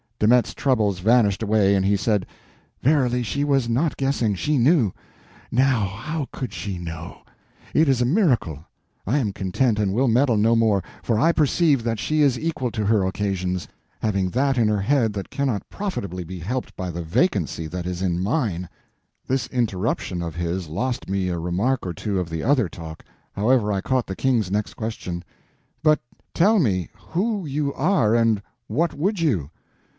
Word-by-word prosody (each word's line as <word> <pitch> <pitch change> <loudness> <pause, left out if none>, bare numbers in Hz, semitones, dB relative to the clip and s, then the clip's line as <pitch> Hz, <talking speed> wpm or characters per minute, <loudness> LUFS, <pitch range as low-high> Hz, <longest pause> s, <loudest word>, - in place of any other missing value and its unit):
De 105 - +2
Metz's 125 +1 +4
troubles 110 -9 +1
vanished 110 0 +3
away, 105 -2 +3
and 95 - +2
he 100 +1 +3
said: 100 -1 +1 0.6
"Verily, 125 -3 +2
she 140 +5 -1
was 135 -4 +2
not 140 +7 +1
guessing, 135 -6 +1
she 150 +10 0
knew. 130 - +4 0.6
Now, 125 -3 +3
how 145 - -4
could 125 -6 -5
she 95 +1 -4
know? 85 -1 -7 0.5
It 155 -1 +4
is 130 -2 +2
a - - +3
miracle. 125 - +1 0.4
I 125 +9 +1
am 115 -8 0
content, 105 +4 0
and 100 -2 +1
will 130 +5 +2
meddle 120 0 +3
no 115 +3 +4
more, 110 -5 +2 0.2
for 115 -3 0
I 165 +8 +4
perceive 150 -4 +2
that 115 -1 -1
she 155 +6 +1
is 135 -4 +3
equal 155 -4 -2
to 110 -2 -2
her 105 -1 +3
occasions, 95 -2 -2 0.3
having 100 -4 0
that 135 +4 +1
in 115 - +4
her 105 -2 +1
head 115 -1 +2
that 100 -2 -6
cannot 130 -7 -1
profitably 100 - -4
be 90 +2 -8
helped 120 +10 -4
by 90 -2 -4
the 85 +1 -5
vacancy 85 - 0
that 90 +2 -5
is 90 0 -3
in 90 -2 0
mine." 95 - -1 0.6
This 130 -2 0
interruption 105 -6 -1
of 85 -2 -5
his 85 +1 -2
lost 120 +11 -3
me 95 -1 0
a 85 -1 -2
remark 95 +10 0
or 90 - -3
two 100 +3 -2
of 90 -2 -3
the 80 0 -4
other 125 -6 +2
talk; 80 -2 -9 0.3
however, 110 +1 +2
I 100 -1 0
caught 130 +2 0
the 95 - -5
King's 115 -7 +1
next 105 +1 -2
question: 90 -6 -5 0.6
"But 155 -1 +4 0.3
tell 210 +5 +4
me 95 - +1
who 200 +2 -2
you 145 0 -1
are, 140 - +2
and 115 -3 +3 0.3
what 155 +8 0
would 190 +7 0
you?" 105 - 0
110 Hz, 180 wpm, -23 LUFS, 95-135 Hz, 0.6 s, Metz's